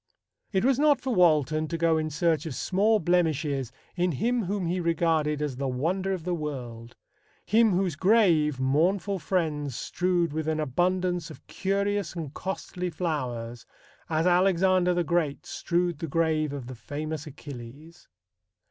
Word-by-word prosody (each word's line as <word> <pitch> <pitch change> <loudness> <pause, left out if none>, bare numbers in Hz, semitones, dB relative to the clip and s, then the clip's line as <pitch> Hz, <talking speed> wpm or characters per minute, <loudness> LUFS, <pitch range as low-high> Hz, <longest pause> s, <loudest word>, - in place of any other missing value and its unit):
It 190 +1 +1
was 270 0 +3
not 295 -1 +4
for 260 - -2
Walton 155 - +3
to 165 - -3
go 165 -1 +2
in 155 0 -2
search 160 +2 0
of 145 - -5
small 205 - +2
blemishes 155 - 0 0.2
in 175 -1 +1
him 235 - 0
whom 195 0 -2
he 175 +2 -1
regarded 160 -3 +1
as 140 -4 -3
the 135 0 -2
wonder 170 +10 -1
of 185 -4 -3
the 180 +1 -1
world 125 -7 -6 0.5
him 220 0 +4
whose 180 -3 0
grave, 170 - +3
mournful 175 +9 +1
friends 150 -7 -1
"strewed... 175 -1 0
with 155 0 -3
an 160 0 0
abundance 175 +4 0
of 155 - -13
curious 200 -1 -1
and 155 -4 -5
costly 180 0 -4
flowers," 125 -9 -4 0.4
as 160 +1 +1
Alexander 180 0 +3
the 175 - +1
Great 165 -4 -1
strewed 175 -2 -1
the 165 - -3
grave 155 -1 +1
of 140 -3 -6
"the 130 - -7
famous 155 +5 -5
Achilles." 145 +3 -11
165 Hz, 155 wpm, -27 LUFS, 150-185 Hz, 0.5 s, not